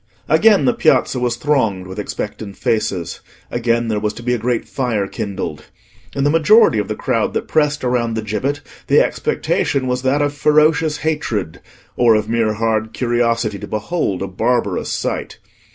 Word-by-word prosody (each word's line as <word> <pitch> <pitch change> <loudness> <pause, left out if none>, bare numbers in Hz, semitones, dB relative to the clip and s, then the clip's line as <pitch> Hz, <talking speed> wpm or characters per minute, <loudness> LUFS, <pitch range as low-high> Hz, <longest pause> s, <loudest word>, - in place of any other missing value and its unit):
Again 220 -3 +4
the 245 - +3
Piazza 225 - +2
was 120 -1 0
thronged 115 -9 0
with 95 +2 -8
expectant 105 0 -5
faces: 100 -6 -1 0.3
again 120 -1 0
there 110 -2 0
was 105 0 -2
to 120 - -10
be 125 +1 0
a 120 - -1
great 120 +1 -1
fire 120 -7 -1
kindled. 95 -8 -5 0.5
In 140 - 0
the 145 - +3
majority 165 - +5
of 105 - -2
the 105 - -3
crowd - - -1
that - - -2
pressed 150 -2 +1
around 120 -2 0
the 110 - -2
gibbet 130 +8 -2 0.3
the - - +5
expectation 135 -2 0
was 125 0 -1
that 135 +3 +1
of 145 0 -1
ferocious 155 +1 +3
hatred, 110 - -2 0.3
or 120 -2 +4
of 105 0 0
mere 115 -1 +1
hard 110 0 -1
curiosity 115 -3 0
to 105 - -7
behold 105 - -2
a - - -3
barbarous 100 +1 -1
sight. - - -3
115 Hz, 170 wpm, -18 LUFS, 105-140 Hz, 0.5 s, majority